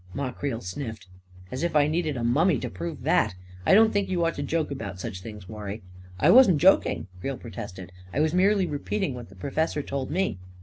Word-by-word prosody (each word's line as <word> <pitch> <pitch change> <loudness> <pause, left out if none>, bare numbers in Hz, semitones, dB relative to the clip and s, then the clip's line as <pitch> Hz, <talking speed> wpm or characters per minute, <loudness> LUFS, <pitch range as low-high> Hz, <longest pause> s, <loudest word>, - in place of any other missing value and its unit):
Ma 140 -2 -2
Creel 125 -4 -3
sniffed. 110 +1 -6 0.3
" 90 0 -20
As 130 - -4
if 170 -1 -1
I 145 -1 +6
needed 155 -2 -1
a 120 - -3
mummy 145 +7 +3
to - - -4
prove 85 -1 -6
that! - - +2 0.3
I - - +7
don't 220 +1 +6
think 200 -1 0
you 175 -2 +1
ought 165 - +1
to - - -5
joke 155 +1 -1
about 100 -9 -5
such 95 0 -5
things, 105 -3 -9
War 105 0 -8
rie." 100 +3 -5 0.2
" 90 0 -18
I - - +5
wasn't 220 - +7
joking," 185 +6 +4
Creel 135 +7 -3
protested. 100 -6 -8
" 90 0 -19
I - - -2
was 155 +1 +2
merely 195 +1 +3
repeating 160 +2 -2
what 120 -4 -8
the 95 - -15
professor 150 - -1
told 135 -2 -3
me." 180 - -1
140 Hz, 230 wpm, -26 LUFS, 105-165 Hz, 0.3 s, I